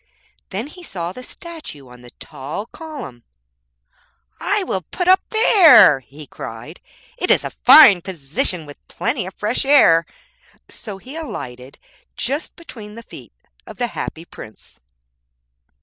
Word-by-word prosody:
Then 205 +5 -4
he 335 +5 -13
saw 175 - -5
the 255 - -10
statue 305 - -10
on 125 0 -15
the 125 - -14
tall 145 - -8
column. 260 - -10 1.2
'I - - 0
will 190 - -3
put 355 - -5
up 375 +1 +5
there,' 325 - +6
he 140 +4 -14
cried; - - -10 0.4
'it - - -2
is - - +4
a - - -5
fine 175 - +7
position 165 0 -2
with 145 -1 -12
plenty 185 - -3
of 190 - -10
fresh 215 +4 -2
air.' 250 - +4 0.6
So 205 -4 -9
he 255 +9 -12
alighted 130 - -8 0.4
just 280 +6 -3
between 230 -10 -12
the 230 - -10
feet - - -14 0.4
of - - -11
the 245 - -1
Happy 165 +1 -6
Prince. 110 -9 -14
195 Hz, 140 wpm, -19 LUFS, -, 1.2 s, fine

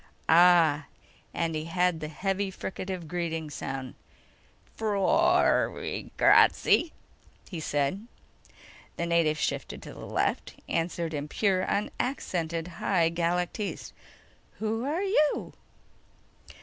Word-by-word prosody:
Ah 165 -4 +5 0.5
..._ - - -6
And 165 -1 0
he 155 0 -3
had 180 0 +1
the 155 - -4
heavy 195 +5 -2
fricative 185 -2 -5
greeting 165 -2 -3
sound. 135 -3 -5 0.8
"Ffroiragrazzi," 315 - +3 0.6
he 175 - -6
said. 150 +8 -1 0.9
The 170 - -1
native 170 -2 +2
shifted - - -3
to - - -9
the - - -10
left, - - -1
answered 165 0 -2
in 145 0 -3
pure, 185 +2 +1
unaccented 175 - -2
High 170 -4 +2
Galactese: 175 +4 -2 0.6
"Who 220 +2 -2
are 320 +7 -1
you?" 305 -7 +1
175 Hz, 100 wpm, -28 LUFS, 160-200 Hz, 0.9 s, Ah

